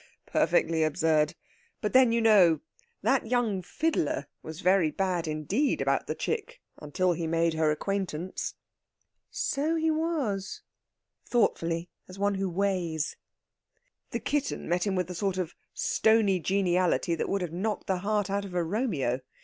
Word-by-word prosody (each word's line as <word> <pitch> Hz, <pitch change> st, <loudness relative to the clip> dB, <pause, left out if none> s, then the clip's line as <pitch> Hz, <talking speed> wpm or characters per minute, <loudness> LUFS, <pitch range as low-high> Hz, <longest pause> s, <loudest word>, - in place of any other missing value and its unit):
"Perfectly 165 Hz, -1 st, +2 dB
absurd! 155 Hz, -1 st, +2 dB, 0.4 s
But 210 Hz, -, -2 dB
then, 255 Hz, -2 st, +6 dB
you 230 Hz, 0 st, +2 dB
know, 200 Hz, -7 st, +5 dB, 0.4 s
that 265 Hz, -4 st, +2 dB
young 230 Hz, -5 st, +1 dB
fiddler 185 Hz, -, -1 dB, 0.2 s
was 160 Hz, +3 st, -8 dB
very 185 Hz, -4 st, +4 dB
bad, 180 Hz, 0 st, -1 dB
indeed, 155 Hz, -, 0 dB
about -, -, 0 dB
the -, -, -2 dB
chick 460 Hz, +3 st, -3 dB, 0.2 s
until 180 Hz, +5 st, 0 dB
he 165 Hz, 0 st, -3 dB
made 165 Hz, 0 st, +1 dB
her 160 Hz, -1 st, +2 dB
acquaintance." 185 Hz, +1 st, -3 dB, 0.7 s
"So 305 Hz, +4 st, -1 dB
he 320 Hz, 0 st, +2 dB
was." 295 Hz, -, -2 dB, 0.6 s
Thoughtfully, 170 Hz, -7 st, 0 dB, 0.2 s
as 185 Hz, -, -11 dB
one 200 Hz, +1 st, +1 dB
who 195 Hz, -1 st, -1 dB
weighs. 175 Hz, -4 st, -1 dB, 0.9 s
"The -, -, -3 dB
kitten 290 Hz, -1 st, -2 dB
met 175 Hz, +3 st, 0 dB
him 195 Hz, -, 0 dB
with 180 Hz, -2 st, 0 dB
a -, -, -4 dB
sort 190 Hz, +1 st, -1 dB
of 180 Hz, -3 st, -2 dB, 0.2 s
stony 220 Hz, -4 st, +3 dB
geniality 180 Hz, -2 st, +1 dB
that 165 Hz, -, -2 dB
would 195 Hz, -, 0 dB
have 170 Hz, -2 st, -5 dB
knocked 205 Hz, +4 st, -2 dB
the 190 Hz, -, 0 dB
heart 205 Hz, 0 st, 0 dB
out 200 Hz, +1 st, -1 dB
of 190 Hz, -3 st, -8 dB
a 175 Hz, -, +2 dB
Romeo. 165 Hz, -, -1 dB
190 Hz, 150 wpm, -28 LUFS, 165-215 Hz, 0.9 s, then